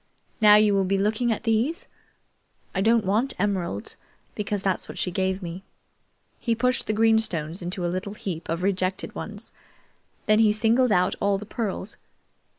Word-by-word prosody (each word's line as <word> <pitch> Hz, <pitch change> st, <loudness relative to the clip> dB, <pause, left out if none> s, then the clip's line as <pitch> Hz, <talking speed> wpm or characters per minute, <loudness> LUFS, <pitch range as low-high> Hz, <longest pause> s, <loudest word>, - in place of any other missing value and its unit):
Now 210 Hz, -1 st, +8 dB
you 210 Hz, -1 st, +5 dB
will 195 Hz, -1 st, +3 dB
be 195 Hz, +1 st, +1 dB
looking 215 Hz, +4 st, +1 dB
at 220 Hz, -, -2 dB
these? 240 Hz, -, 0 dB, 0.9 s
I 190 Hz, -, 0 dB
don't 225 Hz, 0 st, +3 dB
want 225 Hz, +8 st, +1 dB
emeralds, 185 Hz, -, -2 dB, 0.4 s
because 205 Hz, -1 st, -3 dB
that's 190 Hz, -2 st, -1 dB
what -, -, -8 dB
she 180 Hz, -, -1 dB
gave 190 Hz, +1 st, -1 dB
me." 175 Hz, +2 st, -6 dB, 0.8 s
He 230 Hz, -2 st, 0 dB
pushed 250 Hz, +2 st, 0 dB
the 215 Hz, -, +1 dB
green 225 Hz, +1 st, +4 dB
stones 170 Hz, -5 st, -3 dB
into 175 Hz, +1 st, -3 dB
a 175 Hz, -, -1 dB
little 195 Hz, +3 st, -4 dB
heap 175 Hz, -6 st, -6 dB
of 165 Hz, +2 st, -2 dB
rejected 185 Hz, -1 st, -1 dB
ones. -, -, -4 dB, 0.7 s
Then 215 Hz, 0 st, +4 dB
he 215 Hz, -2 st, +5 dB
singled 230 Hz, +3 st, +3 dB
out 180 Hz, -2 st, +3 dB
all 200 Hz, 0 st, +2 dB
the 210 Hz, -, -8 dB
pearls. 210 Hz, -2 st, -4 dB
200 Hz, 170 wpm, -25 LUFS, 185-220 Hz, 0.9 s, Now